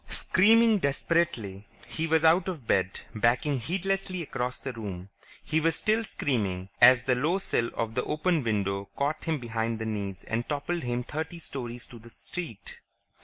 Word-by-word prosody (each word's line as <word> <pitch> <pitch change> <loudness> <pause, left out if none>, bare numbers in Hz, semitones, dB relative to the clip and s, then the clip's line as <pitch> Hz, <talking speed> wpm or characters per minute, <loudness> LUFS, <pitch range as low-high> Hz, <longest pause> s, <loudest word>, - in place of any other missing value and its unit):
Screaming 220 +2 +4
desperately, 135 - 0 0.2
he 160 +1 -3
was 160 0 +3
out 170 +3 +5
of 165 -10 -4
bed, 95 -3 +1
backing 120 +5 +2
heedlessly 185 +5 -1
across 125 -3 -3
the 135 - -3
room. 100 -5 -6 0.3
He 160 - +1
was 165 +1 +1
still 220 +2 +1
screaming 100 - -2
as 125 0 +8
the 130 - +2
low 150 +9 +1
sill 120 -11 0
of 115 -1 -2
the 125 - 0
open 160 0 +1
window 100 -3 -1
caught 145 +3 -1
him 160 -2 0
behind 115 -2 -2
the 110 - -4
knees 100 -3 -4
and 115 +1 -3
toppled 155 +4 -2
him 120 0 -2
thirty 160 +6 -5
stories 125 -7 -6
to 120 - -12
the 115 +1 -14
street. 115 - -6
125 Hz, 170 wpm, -28 LUFS, 110-165 Hz, 0.3 s, as